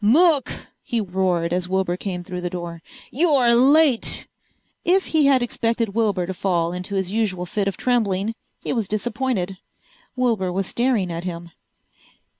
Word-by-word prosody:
"Mook!" 295 - +4 0.3
he 240 -4 -2
roared, 180 -4 0
as 180 0 -1
Wilbur 190 -2 0
came 180 -1 -5
through 180 0 -6
the 175 - -2
door. 170 -2 -6 0.3
"You're 275 -5 +4
late!" 270 +1 +4 0.6
If 370 +2 +3
he 305 -3 +4
had 265 -3 +4
expected 230 -1 -1
Wilbur 200 -4 0
to 190 - -4
fall 175 -2 0
into 180 +3 -5
his 190 -1 -1
usual 200 -5 -1
fit 200 +3 -2
of 195 - -2
trembling 220 -4 0 0.3
he - - -1
was 225 -5 -1
disappointed. 215 -3 -2 0.6
Wilbur 230 -8 0
was 190 +2 -1
staring 235 -5 0
at 170 +1 -4
him. 170 -1 -6
200 Hz, 155 wpm, -22 LUFS, 180-245 Hz, 0.6 s, Mook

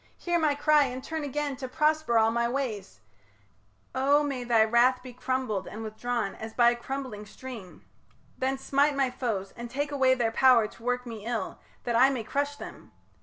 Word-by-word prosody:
Hear 345 -1 0
my 305 -3 +2
cry, 295 0 +4
And 255 0 -5
turn 320 -1 -4
again 290 0 -2
to 260 -1 -5
prosper 305 -2 +1
all 225 0 +4
my 235 +1 0
ways 220 - -4 0.9
O 280 +3 +3
may 275 -4 -3
thy 235 -2 +4
wrath 245 +3 +3
be 255 -1 -9
crumbled 250 -6 -2
and 225 - -7
withdrawn 220 -1 -3
As 220 0 -8
by 240 -1 +5
a - - -2
crumbling 250 -3 -5
stream. 230 -7 -10 0.5
Then 265 +1 -1
smite 280 +2 +2
my 270 -2 +1
foes, 210 -7 -3
And 235 0 -7
take 285 +4 -2
away 260 -2 +3
their 235 -3 0
power 245 -3 +5
to 225 - -17
work 250 +1 -1
me 225 -3 -7
ill, 225 -5 -3 0.2
That 240 -1 -1
I 255 +3 +6
may 255 -4 -2
crush 285 +5 -2
them. - - -11
250 Hz, 190 wpm, -28 LUFS, 230-275 Hz, 0.9 s, I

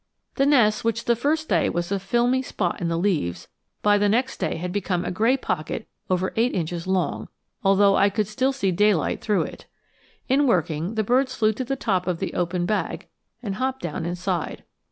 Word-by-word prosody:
The 275 - +2
nest, 235 -7 +4
which 230 0 -1
the 235 - +3
first 310 +6 0
day - - +2
was 175 +2 -2
a 200 - +1
filmy 240 +6 +1
spot 185 -9 -3
in 170 - 0
the 165 0 0
leaves, 150 - -1 0.4
by 205 0 +4
the 205 0 +3
next 250 +5 +1
day - - -1
had 180 +2 -4
become 180 -2 -1
a - - -2
gray 225 +8 +2
pocket 155 - -3 0.2
over 185 0 0
eight 235 +3 +1
inches 170 0 -3
long, 190 -1 -1 0.4
although 195 0 +5
I 200 - +4
could 210 +1 0
still 255 +6 0
see 230 -8 0
daylight 200 -1 +2
through 210 -3 +1
it. - - -9 0.6
In 275 +2 +3
working, 170 -2 0
the 220 - +1
birds 255 +4 +1
flew 215 -2 +2
to 260 - -3
the 270 +2 -2
top 190 -8 -1
of 180 -2 0
the 190 - -4
open 175 0 -1
bag 210 +3 -2 0.3
and 200 -3 -3
hopped 260 +1 -2
down 165 -1 -3
inside. 175 -1 -3
200 Hz, 200 wpm, -24 LUFS, 180-240 Hz, 0.6 s, although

